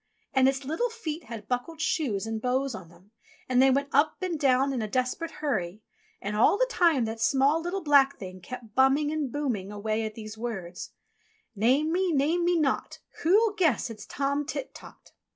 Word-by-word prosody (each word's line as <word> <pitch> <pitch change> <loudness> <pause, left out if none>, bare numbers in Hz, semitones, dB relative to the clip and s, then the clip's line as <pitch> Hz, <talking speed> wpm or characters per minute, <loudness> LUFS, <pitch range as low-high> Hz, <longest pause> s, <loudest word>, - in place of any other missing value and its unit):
And 265 0 +5
its 270 0 -3
little 325 - -1
feet 340 -9 -6
had 220 -3 -8
buckled 255 +7 -3
shoes 280 - -1
and 225 -1 -4
bows 260 +2 0
on 185 -6 -9
them, 175 +4 -21 0.4
and 255 0 +3
they 270 - +6
went 280 +2 +1
up 290 +3 +3
and 345 -4 -2
down 270 0 +3
in 250 - -2
a 215 - -2
desperate 255 +8 -1 0.2
hurry. 210 -6 -2 0.4
And 210 - -4
all 230 - +4
the - - +3
time 340 - +2
that 225 0 -5
small, 280 +6 +3
little, 355 +3 -3
black 280 -2 +4
Thing 185 -4 -9
kept 230 +2 -9
bumming 270 +4 +3
and 300 -5 -2
booming 230 -10 -2
away 215 +2 -2
at 215 -1 -5
these 220 -1 -9
words: 190 -7 -6 0.6
"Name 260 +9 +2
me, 365 +1 +1
name 315 +4 +1
me 350 0 +2
not, 275 -4 -1 0.2
Who'll 420 +6 +4
guess 315 - +1
it's 210 -2 -10
Tom 280 +1 -1
Tit 315 - -5
Tot.' - - -14
270 Hz, 190 wpm, -27 LUFS, 220-310 Hz, 0.6 s, they